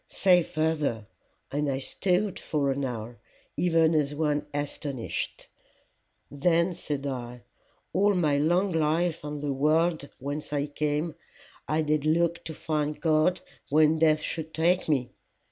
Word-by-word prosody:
Say 180 -2 +4
further. 155 -9 -1 0.5
And 145 +1 0
I 135 - 0
stood 185 +8 0
for 140 -3 0
an 140 +1 -2
hour, 120 -2 -5 0.4
even 165 -2 +3
as 145 -2 +1
one 150 -1 0
astonied. 145 -3 -3 0.9
Then 170 +4 +2
said 145 -4 -4
I, 125 -3 -5 0.5
All 200 +1 +3
my 150 -5 +2
long 175 +6 +2
life 165 +1 +1
on 150 -1 -5
the 145 -1 -1
world 155 +2 +1
whence 145 +3 -5
I 145 -1 +1
came, 150 +2 -2 0.5
I 155 +1 +1
did 150 -1 +1
look 170 +2 +1
to 160 - -5
find 150 -1 -2
God 160 +2 +2 0.3
when 155 +2 +4
death 155 -1 +4
should 160 0 -4
take 170 +2 +2
me. 130 -5 +1
155 Hz, 140 wpm, -27 LUFS, 145-165 Hz, 0.9 s, Say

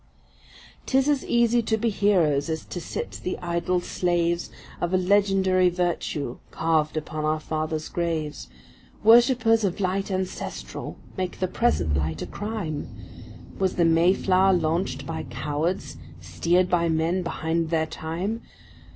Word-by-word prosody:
’Tis 265 +1 +3
as 290 -3 +2
easy 235 0 +3
to 220 0 0
be 225 +1 0
heroes 170 -9 +2
as 160 -1 -3
to 175 - -6
sit - - -5
the 180 - -2
idle 175 +1 -1
slaves 175 -1 0 0.3
Of 175 +2 +1
a - - +5
legendary 190 -1 +3
virtue 170 -7 -2
carved 160 -1 0
upon 155 0 -4
our 155 +1 +1
father’s 155 0 -3
graves, 160 - -3 0.6
Worshippers 230 0 +5
of 190 -2 -1
light 195 +1 -1
ancestral 185 -1 -4 0.2
make 185 -1 -3
the 185 - +1
present 90 - +1
light 80 +3 -1
a - - -4
crime;— 205 -8 -4 0.7
Was 190 -1 +1
the 170 - +3
Mayflower 185 +3 +4
launched 160 -5 0
by - - -4
cowards, 150 +9 -3 0.2
steered 170 - +1
by 170 -2 +2
men 165 +3 +1
behind 165 -1 -1
their 160 -1 +1
time? 175 +8 -4
175 Hz, 135 wpm, -25 LUFS, 160-195 Hz, 0.7 s, a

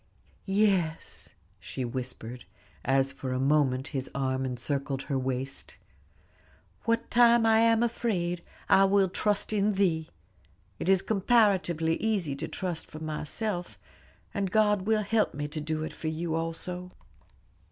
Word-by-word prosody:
"Yes," 195 -5 0 0.2
she 130 - -5
whispered, 125 -1 -5 0.4
as 135 +1 +2
for 130 -1 -4
a 130 - -1
moment 135 -1 +2
his 135 -1 -3
arm 130 -1 0
encircled 135 +2 -2
her 140 -3 -1
waist, 130 +1 -4 1.1
"'What 230 0 0
time 235 -1 +6
I 220 0 +5
am 230 0 +4
afraid, 180 -7 -1 0.3
I 195 - +6
will 195 0 +4
trust 205 +3 0
in 210 0 +2
Thee.' 170 -5 +1 0.7
It - - -2
is 195 -1 +4
comparatively 190 -7 +2
easy 195 -10 -1
to - - -4
trust 175 -4 -4
for 155 - -10
myself, 175 +5 -3 0.6
and 200 -2 -1
God 210 -1 +2
will 220 -1 +3
help 215 -3 +1
me 145 +1 -3
to 155 +1 -4
do 155 +1 -2
it 155 - -5
for 160 - -6
you 160 +1 -2
also." 165 +2 -2
170 Hz, 140 wpm, -28 LUFS, 140-205 Hz, 1.1 s, time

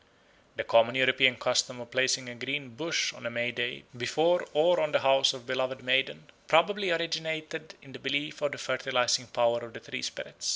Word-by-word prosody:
The - - -3
common 115 +2 +4
European 130 0 +4
custom 125 +1 0
of 120 0 -11
placing 130 0 +1
a 120 - -7
green 135 +3 -4
bush 160 +7 -1
on 120 - -7
May 120 +1 -1
Day 120 0 -3
before 155 +9 +1
or 170 +4 +3
on 155 -1 -1
the - - +3
house 135 0 +4
of 135 - -9
a 130 - -4
beloved 130 0 -2
maiden 130 +2 +1 0.2
probably 195 +5 +3
originated 160 -1 -3
in 135 - -15
the 135 - -10
belief 140 +3 -2
of 145 -1 -1
the - - -7
fertilising 125 -1 0
power 120 0 +1
of 120 -1 -11
the - - -9
tree - - -7
spirit. - - -7
130 Hz, 195 wpm, -28 LUFS, 120-155 Hz, 0.2 s, common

